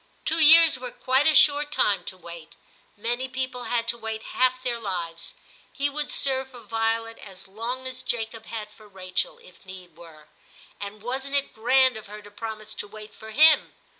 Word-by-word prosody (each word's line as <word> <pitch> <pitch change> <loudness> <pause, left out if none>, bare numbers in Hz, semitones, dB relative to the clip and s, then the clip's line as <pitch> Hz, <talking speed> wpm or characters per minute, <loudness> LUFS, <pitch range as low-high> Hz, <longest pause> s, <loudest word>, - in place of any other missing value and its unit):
*Two 325 - +2
years 320 -2 +8
were 250 0 -6
quite 260 +4 +1
a 315 - +4
short 295 0 +5
time 205 -8 +1
to 185 - -6
wait; 170 -2 -12 0.4
many 240 +4 -2
people 255 -1 -5
had 235 -1 -1
to 235 - -1
wait 220 -1 -5
half 255 0 +1
their 240 -2 -2
lives. 170 -6 -5 0.4
He 285 +1 -2
would 295 +1 -4
serve 265 -1 0
for 245 -2 -13
Violet 225 +1 -2
as 195 -1 -10
long 235 +6 -6
as 255 0 -6
Jacob 225 -2 -4
had 215 -2 -7
for 215 0 -18
Rachel, 185 -2 -3
if 180 - -19
need 185 -3 -12
were; 160 -3 -15 0.5
and 205 +1 -8
wasn't 265 +3 -3
it 280 -1 0
grand 255 +2 +3
of 215 - -11
her 210 +1 -11
to 205 - -14
promise 215 0 -7
to 210 - -7
wait 215 0 -12
for 220 - -12
him 305 +7 +5
225 Hz, 190 wpm, -25 LUFS, 205-260 Hz, 0.5 s, years